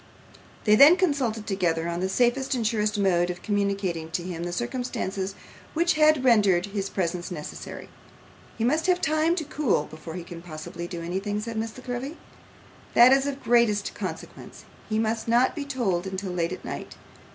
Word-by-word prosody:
They 210 - +4
then 295 +9 +8
consulted 270 - 0
together 170 -5 0
on 170 0 -2
the 190 +1 -1
safest 250 +6 +1
and 235 -3 -1
surest 210 -1 0
mode 180 -3 +2
of 175 0 -6
communicating 200 -5 -1
to 175 +1 -3
him 175 -1 -5
the 175 - -3
circumstances 200 -4 -3 0.4
which 340 +2 +3
had 305 -3 +4
rendered 200 -7 +4
his 200 -1 -3
presence 175 -1 -2
necessary. 155 -5 -7 0.7
'He 225 - -1
must 310 +8 +1
have 360 -1 +3
time 310 +1 +2
to 335 - -2
cool 280 - 0
before 155 +2 -9
he 180 - -5
can 170 0 -9
possibly 170 +1 -7
do 175 -2 -6
anything,' 195 +4 -2
said 230 +1 -5
Miss 220 +1 -3
La 255 - -11
Creevy. 255 +5 -4 0.8
'That 245 +2 +8
is 270 +1 +2
of 285 - -2
the 275 - -18
greatest 230 -4 +2
consequence. - - -7 0.2
He 215 - 0
must 220 +1 -1
not 240 +3 +3
be 295 -3 -4
told 200 -10 -1
until 190 0 -4
late 170 -1 -1
at 185 - -7
night. - - -6
210 Hz, 185 wpm, -26 LUFS, 180-255 Hz, 0.8 s, then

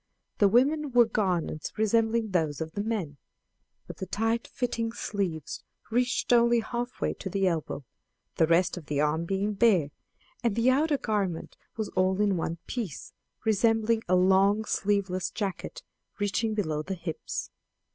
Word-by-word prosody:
The 205 - +6
women 280 +7 +3
wore 240 -1 +7
garments 185 -8 -1
resembling 225 0 +2
those 160 -6 0
of 160 0 -4
the 205 - -3
men, 200 -10 -3 0.7
but - - -9
the 190 - -5
tight 225 +4 0
fitting 230 -3 -2
sleeves 185 - -3 0.3
reached 245 +1 +1
only 235 0 +5
half 240 +2 -4
way - - +1
to 190 - -6
the 195 +1 0
elbow, 160 -5 -2 0.5
the 160 - +4
rest 170 +3 +3
of 160 -5 -9
the 145 -1 -1
arm 150 +3 +1
being 195 +3 -1
bare; 195 -9 +3 0.5
and 230 -4 +1
the 235 +2 +3
outergarment 220 - 0 0.2
was 220 -2 -2
all 185 +1 +1
in 205 -2 +3
one 165 0 -2
piece, 215 - -5 0.3
resembling 225 +1 +2
a 185 - +3
long 195 +3 +4
sleeveless 195 -4 0
jacket, 200 -4 -4 0.3
reaching 210 +2 0
below 155 -8 -1
the 190 +5 -4
hips. 165 -2 -5
205 Hz, 150 wpm, -28 LUFS, 180-230 Hz, 0.7 s, wore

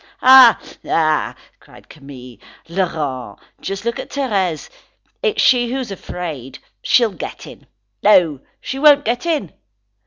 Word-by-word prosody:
"Ah! 255 -3 +8 0.3
ah!" 155 -2 0 0.2
cried - - -19
Camille. 130 -5 -13 0.3
"Laurent, 150 - -4 0.2
just 195 +2 -6
look 235 - -3
at - - -8
Thérèse. 195 - -2 0.5
It's 445 -3 -1
she 245 -2 +3
who 265 - -2
is 255 -6 -5
afraid. 160 -9 -7 0.2
She'll 235 -3 +2
get - - -8
in; - - -14 0.3
no, 180 -9 +3 0.2
she 265 - -6
won't 290 -1 +5
get 245 +8 -2
in." 320 -3 -2
195 Hz, 130 wpm, -18 LUFS, 155-255 Hz, 0.5 s, Ah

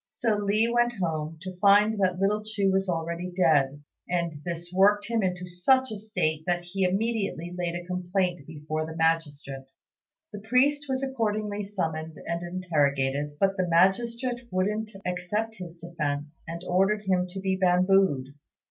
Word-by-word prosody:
So 225 -3 0
Li 205 +2 +2
went 240 0 +2
home, 160 -2 -2
to 185 -1 -7
find 205 +2 +5
that 185 -2 +2
little 205 +3 +1
Chu 205 -2 0
was 190 0 +1
already 170 +1 -2
dead; 145 -6 +2 0.3
and 170 -2 0
this 175 0 -5
worked 205 +2 +4
him 230 -1 0
into 180 -2 -1
such 220 +9 +2
a - - -3
state 160 -7 -2
that 175 0 0
he 190 +2 -2
immediately 195 -3 -1
laid 175 -1 -2
a 175 0 -5
complaint 180 -3 -1
before 155 0 -4
the 160 - -7
magistrate. 145 -5 -1 0.6
The 205 - -5
priest 270 +7 +2
was 265 0 -1
accordingly 215 -5 -1
summoned 160 -6 -3
and 170 0 -2
interrogated; 145 -5 0
but 195 0 +2
the 185 -1 +1
magistrate 235 +8 +2
wouldn't 210 +4 -1 0.2
accept 210 +5 -2
his 175 -2 -9
defence, 150 -3 -4
and 170 +1 -6
ordered 195 +4 +2
him 185 -2 +1
to 185 +2 -7
be 190 0 0
bambooed. 185 -6 +3
180 Hz, 155 wpm, -27 LUFS, 165-210 Hz, 0.6 s, find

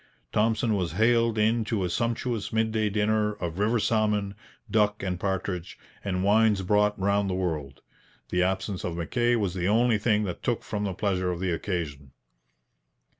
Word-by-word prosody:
Thompson 110 +1 +1
was 90 -6 -1
haled 115 +2 +3
in 110 +2 +2
to 105 -3 -1
a 90 - -1
sumptuous 115 +1 -1
midday 110 -1 +1
dinner 105 +1 +1
of 85 -3 -5
river 110 +4 +2
salmon, 105 -2 +1 0.3
duck 105 -2 +1
and 90 -2 -2
partridge, 95 -2 -3 0.3
and 95 -2 -1
wines 105 -1 +3
brought 105 +2 +2
round 100 +1 +1
the 90 - -1
world. 80 -7 -3 0.5
The 90 - +1
absence 95 +1 -1
of 85 -1 -3
Mackay 120 +8 +1
was 100 -6 0
the 90 -1 -1
only 115 +1 +3
thing 105 -1 +2
that 90 -4 -4
took 120 -3 -1
from 105 -1 -3
the 95 -2 -3
pleasure 95 -3 0
of 85 - -4
the 95 -1 -1
occasion. 80 -7 -4
105 Hz, 170 wpm, -27 LUFS, 90-110 Hz, 0.5 s, haled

